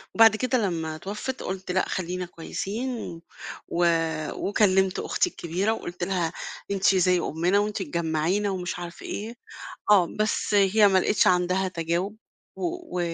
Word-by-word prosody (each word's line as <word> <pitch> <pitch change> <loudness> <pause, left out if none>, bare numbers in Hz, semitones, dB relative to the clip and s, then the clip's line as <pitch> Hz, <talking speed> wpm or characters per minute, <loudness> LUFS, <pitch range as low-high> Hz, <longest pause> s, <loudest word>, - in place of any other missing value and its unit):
وبعد 225 -1 +7
كده 255 +3 +1
لمّا 160 -3 -3
اتوفِّت 210 +10 -5
قُلت 190 -1 -4
لأ 185 +1 +1
خلّينا 180 0 -3
كويسين، 195 +3 -5 0.5
و 175 +1 +1 0.5
وكلّمت 190 -2 +2
أختي 360 - 0
الكبيرة 185 - -1
وقُلت 175 -5 -6
لها 175 -3 -1 0.4
أنتِ 195 0 +3
زي 180 -1 +3
أمّنا 175 +5 +1
وأنتِ 210 -1 -1
تجمّعينا 170 +4 0
ومش 180 -2 -3
عارف 175 -1 -8
إيه، 225 +3 -5 0.6
آه 190 -5 +6
بس 215 0 0
هي 205 +1 +5
ما 190 -1 +4
لقيتش 200 +2 +2
عندها 180 +1 +2
تجاوب، 175 +4 -2 0.4
و 345 - -3
190 Hz, 135 wpm, -26 LUFS, 175-210 Hz, 0.6 s, وبعد